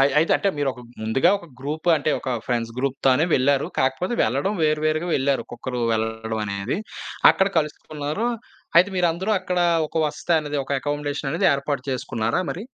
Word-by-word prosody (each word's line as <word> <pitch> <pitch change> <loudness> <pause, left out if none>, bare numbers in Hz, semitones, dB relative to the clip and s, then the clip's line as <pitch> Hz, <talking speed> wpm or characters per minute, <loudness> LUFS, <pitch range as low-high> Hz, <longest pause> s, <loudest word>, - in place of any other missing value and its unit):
అయ్ 140 +1 +5
అయితే 160 - +3
అంటే 200 - 0
మీరు 145 -2 0
ఒక 125 - -12 0.2
ముందుగా 110 +11 +3
ఒక 175 - -11
గ్రూప్ 150 +5 -5
అంటే 150 +1 0
ఒక 130 - -4 0.2
ఫ్రెండ్స్ 115 -2 -1
గ్రూప్‌తోనే 135 +2 +2
వెళ్లారు. 135 +1 +2
కాకపోతే 135 - 0
వెళ్లడం 140 - 0
వేరు 155 0 +2
వేరుగా 155 +3 0
వెళ్లారు, 135 0 +1
ఒక్కొక్కరు 120 +1 -5
వెళ్ళడం 110 0 -2
అనేది, 100 +3 -2 0.5
అక్కడ 190 +1 +2
కలుసుకున్నారు. 150 +5 -3 0.5
అయితే 180 +3 +5
మీరందరూ 180 +3 +1
అక్కడ 185 -1 -2 0.3
ఒక 165 - -10
వసతనేది, 150 -1 -1
ఒక - - -15
అకమోడేషన్ 145 -1 -2
అనేది 175 +4 +2
ఏర్పాటు 140 -1 -2
చేసుకున్నారా 115 -1 -1
మరి? 190 - -5
145 Hz, 160 wpm, -23 LUFS, 130-160 Hz, 0.5 s, అయ్